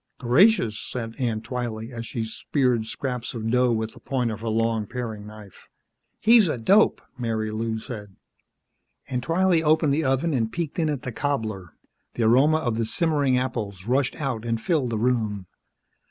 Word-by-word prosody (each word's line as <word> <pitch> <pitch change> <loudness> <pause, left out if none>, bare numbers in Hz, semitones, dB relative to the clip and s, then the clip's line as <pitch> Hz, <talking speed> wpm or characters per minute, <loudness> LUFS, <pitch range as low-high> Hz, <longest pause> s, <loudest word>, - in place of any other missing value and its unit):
"Gracious," 125 - +4
said 115 +2 -5
Aunt 115 -4 -1
Twylee 120 -2 -4
as 115 -2 -6
she 115 - -3
speared 120 0 0
scraps 125 0 -4
of 110 -1 -3
dough 125 0 +3
with 110 -1 -2
the - - -14
point 125 -4 -1
of 110 - -5
her 115 - -6
long 115 -1 0
paring 110 -4 -5
knife. 105 -3 -13 0.5
"He's 225 -3 +6
a 150 - -1
dope!" 195 - +3 0.2
Marilou 110 -1 -2
said. 105 -5 -8 0.9
Aunt 125 -1 -2
Twylee 175 0 +3
opened 155 -2 +3
the 160 +3 +1
oven 135 +4 +1
and 115 -4 0
peeked 170 +1 -3
in 160 -2 +1
at 145 -4 -3
the 125 - -4
cobbler. 110 - -3 0.4
The 120 - 0
aroma 135 +8 +5
of 120 -7 -1
the 115 - +1
simmering 145 0 +2
apples 110 -7 -3
rushed 130 +2 +1
out 130 -6 -3
and 115 -1 -1
filled 140 -1 0
the 115 - -2
room. 110 -4 0
120 Hz, 170 wpm, -25 LUFS, 110-140 Hz, 0.9 s, He's